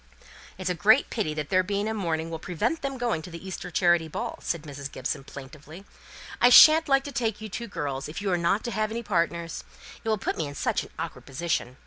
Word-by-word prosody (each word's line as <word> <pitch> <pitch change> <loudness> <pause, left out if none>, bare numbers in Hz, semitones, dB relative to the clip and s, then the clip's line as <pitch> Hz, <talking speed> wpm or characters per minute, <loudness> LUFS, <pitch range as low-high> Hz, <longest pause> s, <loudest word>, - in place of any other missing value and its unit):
"It's 185 -1 -2
a - - +1
great 215 - +4
pity 190 -10 -1
that 150 -1 -4
their 185 -1 +4
being 200 +2 -2
in 220 - -2
mourning 165 -5 -2
will 160 - -4
prevent 210 - -2
their 275 -1 -3
going 235 -9 -1
to 170 - -10
the 170 +2 -9
Easter 185 -1 -6
charity 175 -2 +3
ball," 155 - -5
said 170 -3 -3
Mrs. 140 -2 -7
Gibson, 130 +1 -3
plaintively. 150 +7 -11 0.6
"I 245 - +7
shan't 310 +5 +9
like 270 0 +4
to 285 - -6
take 230 -4 -1
you 215 0 -7
two 235 +4 -5
girls, 145 -7 -4
if 155 - -6
you 200 -1 -1
are - - +3
not 175 +5 +1
to 240 - -3
have 215 -1 0
any 230 +2 -4
partners. 170 -4 -1 0.4
It 225 - -2
will 215 - +2
put - - -3
me 160 - -1
in 145 - -8
such - - 0
an - - -10
awkward - - -6
position. 135 -3 -2
180 Hz, 240 wpm, -26 LUFS, 160-220 Hz, 0.6 s, shan't